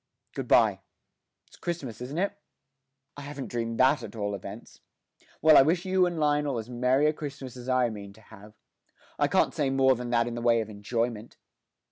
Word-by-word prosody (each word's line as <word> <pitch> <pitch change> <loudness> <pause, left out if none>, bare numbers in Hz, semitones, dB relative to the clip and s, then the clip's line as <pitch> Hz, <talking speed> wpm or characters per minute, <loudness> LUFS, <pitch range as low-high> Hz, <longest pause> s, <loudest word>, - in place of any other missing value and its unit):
Good - - -5
bye. - - +4 0.7
It's - - -20
Christmas, 140 -10 -5
isn't 135 +5 -6
it? 200 +3 0 0.8
I 145 - -9
haven't 140 -1 -7
dreamed 115 -1 -3
that 130 +3 +4
at - - -9
all 100 -2 -2
events. 100 +3 -9 0.6
Well, 155 -1 +7
I - - +10
wish 170 +6 +1
you 185 -1 +3
and 175 -2 -4
Lionel 145 -3 +1
as 115 +2 -6
merry 125 +4 +2
a 155 - +3
Christmas 140 -4 -7
as 125 0 -8
I 125 -2 +2
mean 100 -2 -8
to 110 - -19
have. 105 0 -15 0.6
I - - +3
can't - - +2
say 140 -2 0
more 135 0 +4
than 125 -1 -5
that 120 -1 +2
in 120 - -4
the 120 - -5
way 115 -1 +3
of 110 -1 -4
enjoyment.' 115 +2 -3
125 Hz, 195 wpm, -27 LUFS, 115-145 Hz, 0.8 s, I